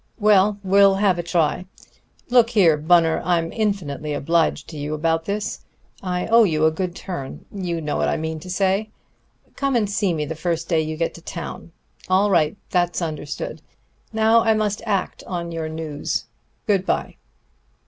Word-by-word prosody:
Well, 205 -1 +4
we'll 195 0 +5
have 195 -3 +2
a - - +1
try.... 170 +1 0 0.6
Look 240 -2 +5
here, 180 -9 +4
Bunner, 165 +1 +3
I'm 165 -1 +1
infinitely 160 -9 -2
obliged 165 +3 +1
to 155 - -8
you 150 +1 -3
about 165 +1 0
this. 205 +1 -3 0.4
I 180 -1 -2
owe 230 +1 +6
you 155 -6 +2
a 160 - +4
good 175 +2 -3
turn. 175 -10 -7
You 175 -4 -3
know 150 -1 -2
I - - +1
mean 160 0 -3
what 155 - -11
I - - -8
say. 195 +3 +1 0.7
Come 275 -2 0
and 220 -3 +2
see 200 -3 0
me 150 -1 -2
the 160 - -4
first 165 0 -2
day 165 -3 +2
you 155 0 -4
get 165 0 -1
to 170 - -12
town.... 170 0 -7 0.4
All 195 +2 +3
right, 160 0 +2
that's 175 -1 +1
understood. 155 -4 -5 0.5
Now 220 +1 +4
I 220 -1 +3
must 210 -1 -1
act 195 -3 -1
on 170 -2 -4
your 165 -1 -4
news. 155 -2 -3 0.4
Good 200 -3 +2
by." - - -2
175 Hz, 175 wpm, -22 LUFS, 160-200 Hz, 0.7 s, owe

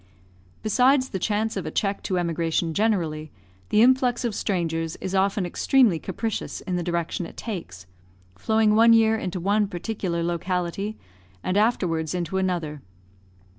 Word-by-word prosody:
Besides 255 +5 +3
the 190 - -3
chance 215 +3 -1
of 185 -5 -3
a - - -1
check 195 +5 -1
to 185 - +1
emigration 165 -1 0
generally, 165 -7 0 0.4
the 215 - +5
influx 250 -1 +3
of 235 - -1
strangers 165 -5 -2
is 190 - -5
often 195 0 +1
extremely 210 0 +3
capricious 220 +5 -4
in 185 - -3
the 175 - -1
direction 170 0 -2
it - - -15
takes, 130 - -6 0.5
flowing 220 - +2
one 230 +2 +6
year 225 -1 +5
into 185 -4 -3
one 205 +3 +1
particular 180 -2 -3
locality, 180 +4 -2 0.5
and 185 - -1
afterwards 180 -7 +1
into 180 +2 -2
another. 170 -6 -2
190 Hz, 145 wpm, -24 LUFS, 170-220 Hz, 0.5 s, one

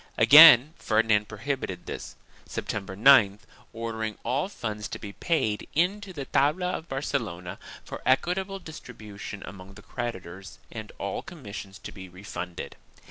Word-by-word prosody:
Again 150 -2 +9
Ferdinand 110 -1 +2
prohibited 110 -5 -4
this, - - -7 0.3
September 95 -2 -5
9th, 110 -4 +6 0.3
ordering 110 -1 -4
all 140 +9 -1
funds 105 - -5
to - - -6
be 100 -1 -9
paid 110 - -1
in 180 +6 +2
to 200 -2 -9
the 145 -6 -6
tabla 165 +8 +1
of 165 - -8
Barcelona, 90 -10 -3 0.3
for - - -7
equitable 185 +9 +1
distribution 110 - -9
among 95 0 -11
the 105 - -13
creditors 95 -6 -6
and 110 -2 -7
all 100 0 -3
commissions 100 - -9
to - - -9
be 95 -2 -10
refunded. 90 -1 -7
110 Hz, 135 wpm, -27 LUFS, 100-145 Hz, 0.3 s, Again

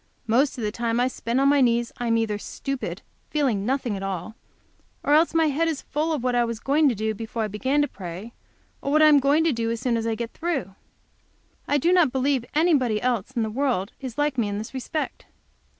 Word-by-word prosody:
Most 255 +6 +2
of 235 - -4
the 210 - -1
time 230 +1 -1
I 250 - +3
spend 240 0 -2
on 275 - +4
my 285 0 +4
knees 235 -1 +2
I 240 - -2
am 230 0 +3
either 215 -2 -1
stupid; 275 +4 -5 0.3
feeling 245 -9 0
nothing 260 -5 0
at 195 - -5
all, 195 +2 -4 0.7
or 290 - +2
else 325 +2 +4
my 325 -1 +4
head 320 +4 +1
is 315 -4 -2
full 310 +2 -1
of 295 -6 -2
what 250 -1 +1
I 240 0 +3
was 230 -1 -3
doing 290 +5 +3 0.3
before 225 +1 -4
I - - -1
began 260 +8 0
to - - 0
pray, 190 +1 -8 0.5
or 280 - -2
what 305 +1 +5
I - - +8
am 295 -2 +7
going 285 +4 +3
to 325 -3 +2
do 230 -1 -1
as 230 0 -2
soon 245 -1 0
as 225 0 -2
I 225 - 0
get 235 0 -5
through. 280 - -3 0.9
I 290 - +2
do 340 +6 +2
not 345 -8 +4
believe 265 -1 +1
anybody 285 -9 +3
else 245 -1 -1
in 230 - +1
the 220 - -3
world 240 -6 0
is 260 -4 -7
like 290 -3 0
me 220 - +1
in 205 0 -3
this 215 +4 -6
respect. 295 +4 -4
250 Hz, 230 wpm, -24 LUFS, 225-290 Hz, 0.9 s, I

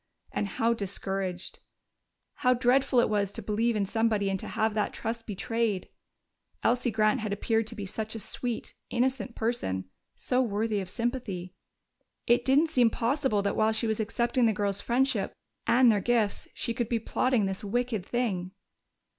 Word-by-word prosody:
And 205 - -1
how 230 +4 +1
discouraged! 195 -3 -3 0.8
How 250 -3 +3
dreadful 250 +1 +3
it - - +2
was 205 -2 0
to 230 - -5
believe 220 +3 +1
in 205 -2 +1
somebody 215 -1 +1
and 190 - -1
to - - -6
have 220 -2 0
that 210 -1 0
trust 225 0 -4
betrayed! 220 -1 -1 0.7
Elsie 245 +1 +2
Grant 215 +2 +2
had 215 -2 -3
appeared 225 +2 0
to 230 - -5
be 205 -3 -5
such 220 +3 -4
a - - -4
sweet, 235 +3 -3 0.2
innocent 250 -1 0
person, 220 - -1 0.3
so 255 0 +1
worthy 215 -2 0
of 190 -2 -5
sympathy. 210 -6 -3 0.7
It 240 +1 +4
didn't 290 +5 +3
seem 245 -6 +5
possible 235 -2 0
that 200 - 0
while 215 0 +3
she 220 - +1
was 220 -1 0
accepting 235 +3 +1
the 220 - +2
girls' 200 -1 -1
friendship 245 -4 +1 0.3
and 245 0 +6
their 205 -2 +1
gifts 225 -2 +1
she 235 - -2
could 235 -1 -2
be 235 - +2
plotting 230 0 +1
this 195 +1 -3
wicked 230 -1 -1
thing. 195 -5 -2
225 Hz, 170 wpm, -28 LUFS, 205-240 Hz, 0.8 s, and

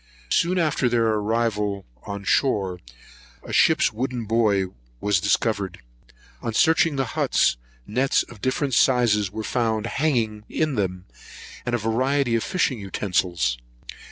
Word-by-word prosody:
Soon 180 - +2
after 150 -7 +1
their 115 -1 +2
arrival 105 -2 -1 0.2
on 100 -1 -5
shore, 95 -4 +1 0.6
a - - -8
ship's - - +4
wooden 125 0 -3
buoy 105 -3 +2 0.3
was 105 +3 +2
discovered. 100 0 0 0.6
On 115 -2 -3
searching 160 +1 +3
the 135 -1 0
huts, - - +2 0.3
nets 130 +6 +1
of 110 -4 -14
different 130 +1 -1
sizes 115 -6 +3
were 110 +1 -5
found 110 -2 -1
hanging 120 -6 0
in 155 -2 0
them, 95 -5 -2 0.6
and 120 - +1
a - - +1
variety 125 +4 0
of 115 - +1
fishing 160 - 0
utensils. 90 -10 -1
115 Hz, 130 wpm, -24 LUFS, 100-130 Hz, 0.6 s, ship's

